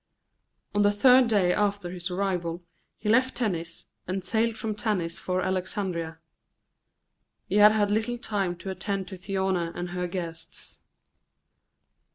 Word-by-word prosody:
On 205 - +2
the 205 0 +5
third 250 +4 +6
day 195 -5 +3
after 200 -3 0
his 180 0 -3
arrival 180 -2 -2 0.3
he 210 - -6
left 255 +4 +3
Tennis 170 -8 -2 0.2
and 185 +1 -2
sailed 225 +3 +1
from 220 -1 -2
Tanis 205 -6 -1
for 185 0 -1
Alexandria. 185 -3 -2 1.3
He 200 - 0
had 210 +1 +9
had 205 -2 +2
little 225 +3 0
time 200 -6 -1
to 190 +2 -6
attend 190 0 -3
to 195 - -6
Thyone 190 0 -1 0.2
and 175 0 -4
her 180 0 -2
guests. 170 -2 -6
195 Hz, 140 wpm, -27 LUFS, 180-210 Hz, 1.3 s, had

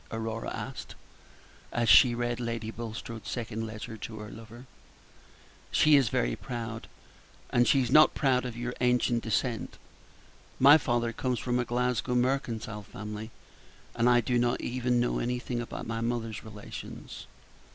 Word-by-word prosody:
Aurora 115 0 -4
asked, - - -6 0.8
as 120 -1 0
she 120 0 +7
read 120 0 -2
Lady 115 -2 -3
Bulstrode's 115 -1 -7
second 115 -2 -4
letter 110 +1 -7
to 110 0 -7
her 105 -1 -8
lover. 115 +3 -11 1.0
"She 150 -1 +5
is 135 -6 +4
very - - 0
proud, 115 -2 -6 0.7
is 120 0 +4
she 135 -2 +4
not 155 +6 +6
proud 130 -3 +2
of 125 -2 -5
your 120 +1 -3
ancient 125 -1 +2
descent. 115 +1 -2 0.8
My 145 +4 +8
father 120 -3 0
comes 125 +1 -1
from 125 0 -1
a 120 - 0
Glasgow 125 +1 0
mercantile 120 -4 -1
family, 105 +2 -7 0.7
and 120 +1 +3
I 120 0 +5
do 120 +1 +1
not 120 0 +1
even 125 0 0
know 120 - +1
anything 125 0 -2
about 120 - -6
my 115 0 -3
mother's 115 -3 -3
relations." 105 -2 -9
120 Hz, 145 wpm, -29 LUFS, 115-125 Hz, 1.0 s, My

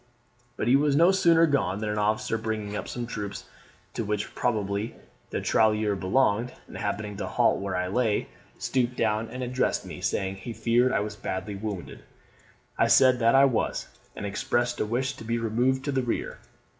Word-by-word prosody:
"But - - -2
he 125 - +6
was 145 0 +3
no 170 +5 +6
sooner 170 -4 +5
gone, 100 - +1
than 105 +1 -3
an 105 0 -1
officer 110 +1 0
bringing 110 -2 -3
up 105 - -4
some 120 -1 -4
troops, 105 -4 -5 0.5
to 115 - -2
which 105 0 -3
probably 105 -2 -1 0.3
the - - -3
tirailleur 105 -1 +2
belonged 105 +4 +1
and - - -13
happening 105 -1 -3
to - - -3
halt - - +2
where 100 -1 -3
I 90 0 -1
lay, 110 +1 0 0.3
stooped 125 -1 0
down 110 0 0
and 130 0 -5
addressed 125 +1 0
me, - - -8
saying, 95 0 -1
he 115 +5 -7
feared 120 +3 +2
I - - +1
was 105 0 -4
badly 95 0 -4
wounded; 100 - -6 0.8
I - - +5
said 130 -2 +5
that 115 +1 +4
I 135 +1 +7
was, 125 -5 -1 0.3
and - - -5
expressed 120 +4 -1
a - - 0
wish 130 +4 -1
to - - -9
be 115 +1 -1
removed 120 +4 0
to 145 - 0
the 135 -1 +1
rear. 120 -2 -3
110 Hz, 190 wpm, -27 LUFS, 105-125 Hz, 0.8 s, I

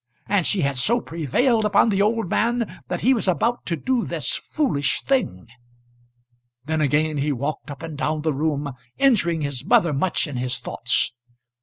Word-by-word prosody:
And 195 -4 +1
she 200 - +2
had 140 -2 0
so 235 - +2
prevailed 220 - 0
upon 210 +2 +4
the 200 -2 +1
old 220 0 +1
man 235 +4 -1
that 180 - -3
he 260 +4 +4
was 225 -5 -1
about 225 - 0
to 170 - 0
do 250 - 0
this - - -2
foolish 145 - -1
thing! 255 - 0 1.2
Then 160 +1 -1
again 150 +1 +1
he 145 +2 0
walked 140 +4 -3
up 145 +2 -8
and 160 -3 -7
down 155 -1 -1
the 155 -1 +1
room, 145 -1 -1 0.2
injuring 190 - +3
his 140 -3 -3
mother 200 -5 +3
much 170 +6 +1
in 145 -5 -5
his 125 0 0
thoughts. - - 0
165 Hz, 175 wpm, -23 LUFS, 145-225 Hz, 1.2 s, upon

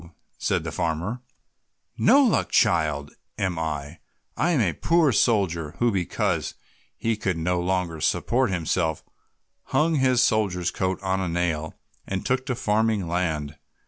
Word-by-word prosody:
said - - 0
the - - -4
farmer, 85 +10 -2 0.7
"no 275 +6 +5
luck 240 - +2
child 75 -2 +2 0.3
am 90 -3 -1
I. 75 -1 -4 0.4
I 170 - +1
am 165 -6 +2
a 95 -8 +2
poor 165 - +2
soldier, 90 -9 +1
who 120 +3 +2
because 95 -4 -1 0.4
he 115 0 0
could 95 -5 -2
no 90 +2 0
longer 90 -3 -1
support 125 +10 +1
himself 80 -3 -1 0.6
hung 160 +1 +1
his 130 -2 +3
soldier's 95 -7 +1
coat 95 0 -1
on 95 0 0
a 95 - -1
nail 85 -2 -2 0.3
and 95 -1 -3
took 130 0 0
to 125 - -1
farming 110 -3 +1
land. 80 -4 -2
95 Hz, 145 wpm, -25 LUFS, 80-115 Hz, 0.7 s, no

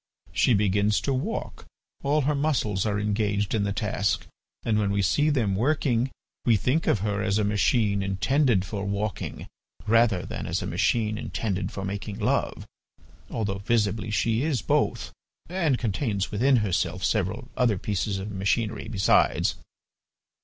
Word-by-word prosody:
She 120 - +3
begins 105 +1 +2
to 140 - 0
walk, 130 - -4 0.3
all 145 +2 +2
her 145 +2 +1
muscles 130 -9 0
are 105 -1 0
engaged 105 -1 0
in 105 -2 +1
the 100 - -1
task, 95 - -1 0.4
and, 110 -2 +1
when 105 -2 +1
we 100 0 +1
see 145 +10 +2
them 115 -10 +1
working, 130 0 +1 0.3
we 115 -3 +4
think 140 - 0
of 105 - +2
her 105 -1 -1
as 100 -1 +1
a 105 - +2
machine 105 0 +2
intended 100 +2 +1
for 100 0 -4
walking 100 0 -3 0.4
rather 110 -4 +3
than - - -5
as - - -1
a - - -4
machine 110 -2 0
intended 100 -3 -3
for 95 - -5
making 100 +1 -5
love, - - -1 0.6
although 100 -3 -2
visibly 105 0 0
she 110 +4 +1
is 145 -6 0
both, - - 0 0.4
and 165 -7 +1
contains 105 -3 -1
within 130 +6 +3
herself 90 -1 -1
several 110 +5 -1
other 115 -5 +2
pieces 100 +1 -2
of 95 +2 -5
machinery, 105 +3 -1
besides. 100 -4 +2
105 Hz, 155 wpm, -26 LUFS, 100-120 Hz, 0.6 s, we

